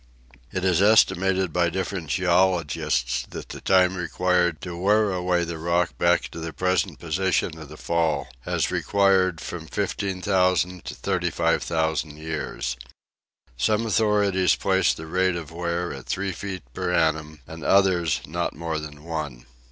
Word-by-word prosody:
It 95 Hz, 0 st, -2 dB
is 90 Hz, -1 st, +3 dB
estimated 95 Hz, -4 st, +3 dB
by 85 Hz, -1 st, +2 dB
different 95 Hz, -1 st, -3 dB
geologists 85 Hz, -7 st, +1 dB
that -, -, -8 dB
the -, -, -8 dB
time 95 Hz, -1 st, +4 dB
required 90 Hz, -1 st, +1 dB
to 90 Hz, -2 st, -6 dB
wear 105 Hz, +3 st, +2 dB
away 90 Hz, -1 st, +1 dB
the 85 Hz, -1 st, -5 dB
rock 85 Hz, +1 st, 0 dB
back 85 Hz, 0 st, +3 dB
to -, -, -8 dB
the 80 Hz, 0 st, -5 dB
present 90 Hz, +1 st, 0 dB
position 85 Hz, 0 st, -1 dB
of 75 Hz, -3 st, -10 dB
the 75 Hz, -, -11 dB
fall 80 Hz, -5 st, 0 dB
has -, -, -1 dB
required 95 Hz, -4 st, +2 dB
from 80 Hz, -1 st, -7 dB
15,000 90 Hz, +1 st, 0 dB
to -, -, -6 dB
35,000 80 Hz, -2 st, 0 dB
years. 75 Hz, -5 st, -4 dB, 0.8 s
Some 105 Hz, -, +1 dB
authorities 105 Hz, -3 st, +2 dB
place 95 Hz, -1 st, +2 dB
the 80 Hz, -, -6 dB
rate 95 Hz, +2 st, +1 dB
of 80 Hz, -2 st, -6 dB
wear 85 Hz, +1 st, -2 dB
at 65 Hz, -2 st, -10 dB
three 95 Hz, 0 st, -1 dB
feet 95 Hz, 0 st, -6 dB
per 90 Hz, -, -2 dB
annum 80 Hz, -3 st, 0 dB
and 80 Hz, +1 st, -9 dB
others 95 Hz, -5 st, +3 dB
not 85 Hz, +3 st, -3 dB
more 80 Hz, 0 st, -3 dB
than 75 Hz, -1 st, -9 dB
one. 75 Hz, -7 st, -5 dB
85 Hz, 145 wpm, -24 LUFS, 80-95 Hz, 0.8 s, time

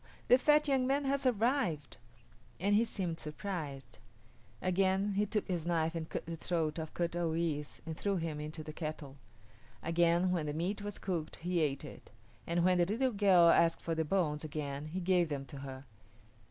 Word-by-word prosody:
the 250 Hz, -, +8 dB
fat 300 Hz, +2 st, +4 dB
young 265 Hz, -2 st, +2 dB
man 280 Hz, +1 st, +1 dB
has 275 Hz, 0 st, +1 dB
survived!" 235 Hz, -, 0 dB, 0.6 s
and 200 Hz, +3 st, +2 dB
he 215 Hz, +3 st, +5 dB
seemed 185 Hz, -7 st, -3 dB
surprised. 150 Hz, -, -5 dB, 0.6 s
Again 190 Hz, +2 st, +1 dB
he 205 Hz, +2 st, +1 dB
took 210 Hz, +1 st, -1 dB
his 175 Hz, -4 st, -1 dB
knife 165 Hz, -1 st, 0 dB
and 160 Hz, -1 st, -4 dB
cut -, -, -4 dB
the 165 Hz, 0 st, -4 dB
throat 165 Hz, -2 st, -1 dB
of 160 Hz, -1 st, -6 dB
Kut 170 Hz, -1 st, -1 dB
o 175 Hz, -1 st, 0 dB
yis´ 160 Hz, -3 st, -2 dB
and 160 Hz, -1 st, -4 dB
threw 200 Hz, +4 st, -1 dB
him 165 Hz, -4 st, -3 dB
into 155 Hz, +1 st, -6 dB
the 155 Hz, -, -7 dB
kettle. 155 Hz, -4 st, -6 dB, 0.7 s
Again 170 Hz, +2 st, +3 dB
when 165 Hz, -4 st, 0 dB
the 145 Hz, -, -2 dB
meat 185 Hz, +6 st, -2 dB
was 205 Hz, 0 st, -5 dB
cooked 170 Hz, -5 st, -3 dB
he 175 Hz, +1 st, -1 dB
ate 145 Hz, -3 st, 0 dB
it, -, -, -11 dB, 0.4 s
and 170 Hz, +1 st, +1 dB
when 180 Hz, -1 st, +4 dB
the 175 Hz, -, +5 dB
little 250 Hz, +6 st, +1 dB
girl 195 Hz, -5 st, +5 dB
asked 165 Hz, 0 st, +4 dB
for 165 Hz, -, -1 dB
the 160 Hz, 0 st, 0 dB
bones 155 Hz, -3 st, 0 dB
again 145 Hz, -2 st, -4 dB
he 175 Hz, +5 st, -4 dB
gave 180 Hz, -2 st, +2 dB
them 140 Hz, -2 st, -3 dB
to 135 Hz, +1 st, -9 dB
her. 135 Hz, 0 st, -8 dB
170 Hz, 195 wpm, -33 LUFS, 155-195 Hz, 0.7 s, the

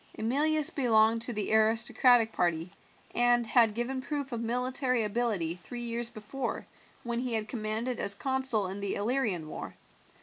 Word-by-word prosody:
Emilius 300 Hz, +7 st, +1 dB
belonged 225 Hz, -6 st, +3 dB
to 240 Hz, -, -1 dB
the 210 Hz, -2 st, -2 dB
aristocratic 225 Hz, +1 st, +4 dB
party, 170 Hz, -2 st, -1 dB, 0.4 s
and 240 Hz, 0 st, +3 dB
had 225 Hz, -2 st, +4 dB
given 255 Hz, +3 st, -2 dB
proof 285 Hz, -1 st, -4 dB
of 235 Hz, -1 st, -3 dB
military 250 Hz, +1 st, 0 dB
ability 210 Hz, -6 st, -1 dB
three 240 Hz, +7 st, -7 dB
years 235 Hz, 0 st, -2 dB
before 240 Hz, +3 st, -5 dB, 0.4 s
when 235 Hz, -1 st, -2 dB
he 245 Hz, -2 st, -1 dB
had 215 Hz, -1 st, -1 dB
commanded 225 Hz, +2 st, -3 dB
as 200 Hz, -, 0 dB
consul 265 Hz, -3 st, +1 dB
in 190 Hz, +2 st, -5 dB
the 200 Hz, -1 st, -2 dB
Illyrian 210 Hz, -7 st, 0 dB
war. -, -, -8 dB
235 Hz, 155 wpm, -29 LUFS, 215-250 Hz, 0.4 s, aristocratic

